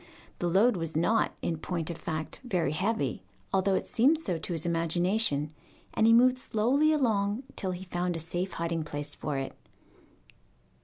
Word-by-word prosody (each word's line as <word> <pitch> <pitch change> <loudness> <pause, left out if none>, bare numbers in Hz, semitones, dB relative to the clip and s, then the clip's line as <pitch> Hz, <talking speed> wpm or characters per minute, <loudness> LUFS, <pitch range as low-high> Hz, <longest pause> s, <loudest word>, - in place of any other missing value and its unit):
The 175 - 0
load 205 +5 +4
was 165 -2 -4
not, 215 +8 +2
in 165 -2 -1
point 170 0 -3
of 165 - -7
fact, 155 -2 -4
very 180 - 0
heavy, 180 - -1 0.3
although 190 0 +3
it - - -1
seemed 280 +7 +3
so 180 - -2
to 175 - -4
his 165 -1 -2
imagination, 170 -2 +1 0.4
and 220 - +3
he - - +6
moved 250 +2 +5
slowly 260 +6 +2
along 220 -5 +1
till 190 - -3
he 180 0 -4
found 180 -1 -2
a - - -3
safe 175 +3 -3
hiding 165 -1 -2
place 145 -1 -4
for 145 -2 -3
it. 135 0 -4
180 Hz, 170 wpm, -29 LUFS, 165-225 Hz, 0.4 s, he